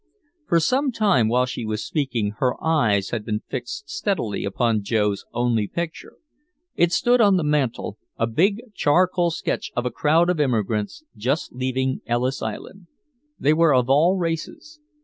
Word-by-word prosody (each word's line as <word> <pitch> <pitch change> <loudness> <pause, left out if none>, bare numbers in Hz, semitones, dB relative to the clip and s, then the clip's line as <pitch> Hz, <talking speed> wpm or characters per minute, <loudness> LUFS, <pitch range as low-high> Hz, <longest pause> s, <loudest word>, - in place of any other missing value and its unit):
For 170 - +3
some 260 - +1
time 200 - +2
while 125 +3 +2
she 125 -2 -5
was 110 -1 -3
speaking 120 -9 -1
her 125 -2 +2
eyes 110 -12 +2
had 115 -3 -2
been 105 0 -3
fixed 410 0 -5
steadily 195 - -2
upon 110 +2 0
Joe's 105 -1 0
only 120 -3 0
picture. 170 +4 -5 0.6
It 170 0 +2
stood 245 +4 +3
on 200 -3 +5
the 175 - 0
mantel, 150 -5 -1 0.2
a 115 - +1
big 190 - +1
charcoal 180 +2 +2
sketch 165 - -3
of 125 - -1
a 125 - -1
crowd 165 +4 +3
of 175 - -3
immigrants 115 - -1
just 130 +9 -2
leaving 130 +1 -2
Ellis 125 +3 -1
Island. 190 -3 -7 0.5
They 150 - +3
were 160 -3 +4
of 125 +1 +2
all 165 +7 +4
races. 175 - -4
140 Hz, 160 wpm, -23 LUFS, 115-175 Hz, 0.6 s, on